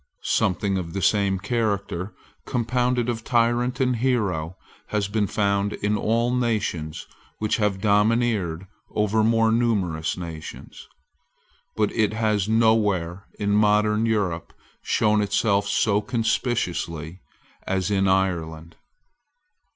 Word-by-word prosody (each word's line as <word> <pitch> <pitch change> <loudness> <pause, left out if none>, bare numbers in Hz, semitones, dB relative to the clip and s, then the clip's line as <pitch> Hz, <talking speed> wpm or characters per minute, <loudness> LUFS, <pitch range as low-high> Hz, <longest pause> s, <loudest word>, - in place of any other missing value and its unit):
Something 95 +1 +1
of 85 -2 -6
the 95 - -3
same 100 -1 +2
character, 100 -3 -2 0.3
compounded 125 0 0
of 115 -2 -3
tyrant 120 +2 +1
and 125 -2 +1
hero, 100 -9 -1 0.3
has 105 -2 -1
been 105 0 0
found 100 0 0
in 105 +1 -1
all 115 +3 +1
nations 105 -10 -2 0.3
which 110 -1 0
have 105 -3 0
domineered 105 -4 +1 0.2
over 105 +1 +1
more 115 0 +3
numerous 100 -9 0
nations. 85 -3 -9 0.9
But 105 -1 +1
it 110 -1 +1
has 110 -2 0
nowhere 105 -5 +1
in 100 -1 -1
modern 105 +1 +3
Europe 95 -7 -1 0.3
shown 105 -1 +2
itself 100 0 +1
so 105 0 +2
conspicuously 95 - -2 0.5
as 95 0 -1
in 95 -1 +2
Ireland. 85 -4 -1
105 Hz, 110 wpm, -24 LUFS, 95-115 Hz, 0.9 s, more